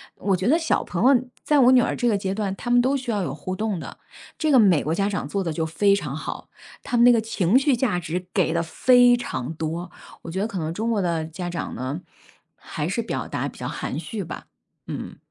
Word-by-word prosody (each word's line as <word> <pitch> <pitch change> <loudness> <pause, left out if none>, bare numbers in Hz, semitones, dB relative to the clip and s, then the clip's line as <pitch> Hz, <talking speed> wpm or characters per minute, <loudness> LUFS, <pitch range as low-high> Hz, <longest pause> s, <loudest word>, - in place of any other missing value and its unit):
我 195 0 0
觉 185 +3 -2
得 300 +6 +5
小 325 -1 0
朋 175 +1 -3
友 245 - +1 0.2
在 295 -1 +3
我 255 -1 +6
女 255 -1 +6
儿 - - 0
这 245 - 0
个 215 -3 +3
阶 195 -1 -2
段， 200 -2 -2
他 240 - -6
们 245 0 +6
都 265 +3 +1
需 250 -3 -4
要 205 - 0
有 140 -7 -3
互 185 +5 -5
动 210 -1 -2
的， - - -9 0.4
这 310 -1 +1
个 270 - +6
美 190 - +5
国 160 +2 -1
家 195 +2 +1
长 200 - -3
做 200 -1 -2
得 170 - -2
就 160 +1 -1
非 200 +5 +3
常 150 -8 -4
好， 155 - -6 0.3
他 245 - -3
们 235 - +5
那 245 - +8
个 235 - +4
情 220 0 +2
绪 275 -1 +2
价 230 -7 0
值 175 +2 -4
给 175 -4 +2
的 170 0 0
非 245 +9 +5
常 130 - -4
多， 165 +2 -4 0.3
我 165 - -7
觉 185 - -3
得 210 - 0
可 200 - -6
能 160 -1 -2
中 220 +5 -2
国 220 -3 +1
的 170 -3 -1
家 175 +3 -6
长 170 -1 -4
呢， 130 +6 -4 0.6
还 - - -5
是 - - -1
表 - - -4
达 - - -3
比 - - -15
较 - - -4
含 145 - -4
蓄 205 +2 -5
吧， 165 - -8 0.4
嗯。 - - -6
195 Hz, 270 characters per minute, -24 LUFS, 165-240 Hz, 0.6 s, 那